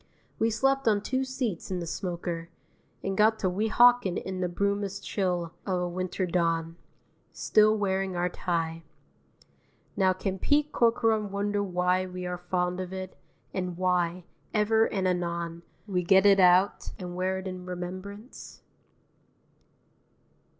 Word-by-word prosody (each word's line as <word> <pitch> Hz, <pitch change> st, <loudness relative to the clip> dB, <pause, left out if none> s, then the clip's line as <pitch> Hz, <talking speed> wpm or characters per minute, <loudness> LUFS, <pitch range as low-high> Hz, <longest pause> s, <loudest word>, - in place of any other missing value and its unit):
We 225 Hz, -, +3 dB
slept 270 Hz, +4 st, +1 dB
on 210 Hz, -2 st, +3 dB
two 260 Hz, +5 st, -1 dB
seats 255 Hz, -9 st, -3 dB
in 185 Hz, -1 st, -2 dB
the 170 Hz, -, -4 dB
smoker, 170 Hz, -1 st, -4 dB, 0.5 s
and 195 Hz, 0 st, -2 dB
got 220 Hz, +2 st, +4 dB
to 195 Hz, -, 0 dB
Weehawken 220 Hz, 0 st, +4 dB
in 185 Hz, -1 st, -4 dB
the 180 Hz, -, +1 dB
brumous 200 Hz, +2 st, -1 dB
chill 180 Hz, -4 st, -2 dB
of 185 Hz, -2 st, -1 dB
a 180 Hz, -, -1 dB
winter 185 Hz, +1 st, -2 dB
dawn 165 Hz, -2 st, 0 dB, 0.6 s
still 215 Hz, 0 st, +3 dB
wearing 190 Hz, -2 st, -1 dB
our 175 Hz, 0 st, +1 dB
tie. 165 Hz, -2 st, -2 dB, 1.1 s
Now 190 Hz, -1 st, +3 dB
can 190 Hz, 0 st, -3 dB
Pete 295 Hz, +5 st, +2 dB
Corcoran 225 Hz, -3 st, +2 dB
wonder 205 Hz, +1 st, -1 dB
why 180 Hz, -1 st, +1 dB
we 180 Hz, 0 st, -6 dB
are 180 Hz, 0 st, -4 dB
fond 180 Hz, 0 st, -1 dB
of 185 Hz, -1 st, -5 dB
it, 190 Hz, 0 st, -6 dB, 0.4 s
and 180 Hz, -2 st, -3 dB
why, 180 Hz, -1 st, 0 dB, 0.3 s
ever 220 Hz, +1 st, +4 dB
and 190 Hz, -2 st, -1 dB
anon, 170 Hz, -2 st, -2 dB, 0.2 s
we 185 Hz, -4 st, -1 dB
get 190 Hz, +3 st, +4 dB
it 200 Hz, -1 st, +6 dB
out 185 Hz, +1 st, +4 dB
and 180 Hz, -1 st, -7 dB
wear 185 Hz, +1 st, 0 dB
it 190 Hz, -, -6 dB
in 185 Hz, -1 st, -7 dB
remembrance? 185 Hz, +6 st, -8 dB
185 Hz, 145 wpm, -28 LUFS, 180-205 Hz, 1.1 s, it